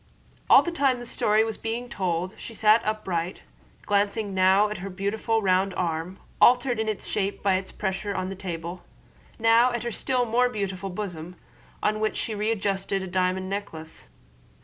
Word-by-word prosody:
All - - +8
the 345 - -2
time 275 -6 +2
the 240 - -8
story 215 -2 +2
was 225 0 -4
being 230 +2 -3
told 185 -4 -2
she 230 - -9
sat 215 +1 +5
upright, 185 -5 -2 0.4
glancing 205 0 0
now 190 +2 +4
at 210 - -5
her 195 +2 -5
beautiful 210 +4 -1
round 190 0 +2
arm, 170 +1 -2 0.2
altered 245 -1 +5
in 220 -2 -1
shape 200 0 -3
by 200 -1 +3
its 190 0 -2
pressure 195 0 -3
on 185 - -2
the 195 - -5
table, 175 -1 -6 0.5
now 230 +2 +5
at 240 -1 -3
her 240 - -3
still 250 +2 0
more 245 +2 +2
beautiful 195 -4 -4
bosom, 180 -3 -6 0.5
on 215 0 +1
which 215 0 -1
she 225 - -3
readjusted 200 -2 -1
a - - -5
diamond 185 +1 0
necklace. 185 -5 -6
200 Hz, 170 wpm, -26 LUFS, 185-225 Hz, 0.5 s, All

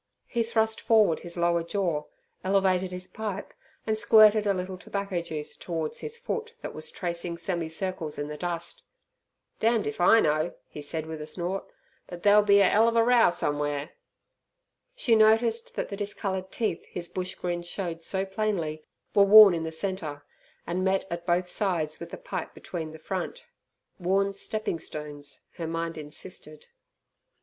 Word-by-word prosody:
He 235 - -1
thrust 220 -1 +1
forward 215 -8 +4
his 175 0 -9
lower 170 0 +2
jaw, 170 -3 -1 0.4
elevated 190 -1 +2
his 180 0 -5
pipe, 215 -1 -5 0.3
and 220 - +1
squirted 215 -1 +6
a 200 - +4
little 185 +1 -4
tobacco 200 -3 -3
juice 155 -3 -6
towards 165 -3 -3
his 455 +1 -6
foot 465 -1 -4
that - - -5
was 480 - -5
tracing 170 - -4
semicircles 170 -1 -3
in 145 - -3
the 150 - -5
dust. 170 +1 -4 0.8
"Damned 225 0 +2
if 145 - -3
I 225 +6 +7
know," 155 -1 +1
he 150 - -9
said 155 +2 -3
with 160 -1 -6
a 150 - -6
snort, 185 +3 -3 0.4
"but 175 -1 -9
there'll 205 +1 +7
be 200 -1 +5
a 195 - +6
'ell 220 +2 +5
of 230 - +1
a 230 - +5
row 240 -3 +5
somew'ere." 145 -2 -2 1.0
She 265 - +2
noticed 225 +1 +4
that - - -2
the 200 - -5
discoloured 195 -2 -3
teeth 215 -7 -1
his 175 -1 -4
bush 185 +1 -4
grin 175 -1 -2
showed 175 -1 -4
so 190 +3 -1
plainly, 190 -7 -2 0.3
were 200 - +5
worn 205 -1 +10
in 165 -1 -2
the 160 - -3
centre, 160 -4 -4 0.4
and 180 +2 -1
met 190 0 +1
at 170 +1 -5
both 180 +1 +2
sides 175 -6 -1
with - - -7
the - - -7
pipe - - -5
between 160 -3 -6
the 160 - -10
front. 190 - -5 0.5
Worn 195 +2 +1
stepping 215 -2 -3
stones, 145 -2 -6
her 165 - -3
mind 165 0 -3
insisted. 155 0 -8
185 Hz, 170 wpm, -27 LUFS, 165-210 Hz, 1.0 s, worn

